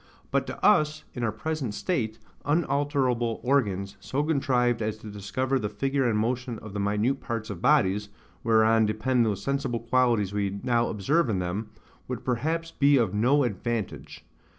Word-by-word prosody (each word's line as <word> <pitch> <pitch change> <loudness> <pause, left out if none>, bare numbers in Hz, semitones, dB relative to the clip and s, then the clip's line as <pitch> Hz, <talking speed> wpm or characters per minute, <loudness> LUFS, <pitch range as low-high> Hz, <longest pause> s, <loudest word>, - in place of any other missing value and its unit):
But - - +1
to - - -4
us, 155 0 +4
in 125 - -5
our 115 - +1
present 130 0 -3
state, 115 - -1 0.3
unalterable 140 -6 0
organs, 100 -7 0
so 135 +8 -2
contrived 125 -6 +1
as 110 0 -2
to 110 -1 -9
discover 130 +7 -1
the 105 -3 -2
figure 135 0 0
and 110 - +1
motion 120 +2 -1
of 105 -2 -10
the 100 - -3
minute 105 +7 +1
parts 115 -4 -4
of 90 -4 -7
bodies, 100 +2 +3 0.3
whereon 110 -1 +4
depend 115 +3 +1
those 100 -3 -2
sensible 140 -4 -1
qualities 115 -4 +1
we 100 -1 -1
now 120 -1 +2
observe 135 - +1
in 105 - 0
them, 90 +5 -3 0.4
would - - -5
perhaps 160 +7 -1
be 145 -1 +4
of 115 -6 +1
no 130 +7 +3
advantage. 115 -1 -4
120 Hz, 165 wpm, -27 LUFS, 105-135 Hz, 0.4 s, us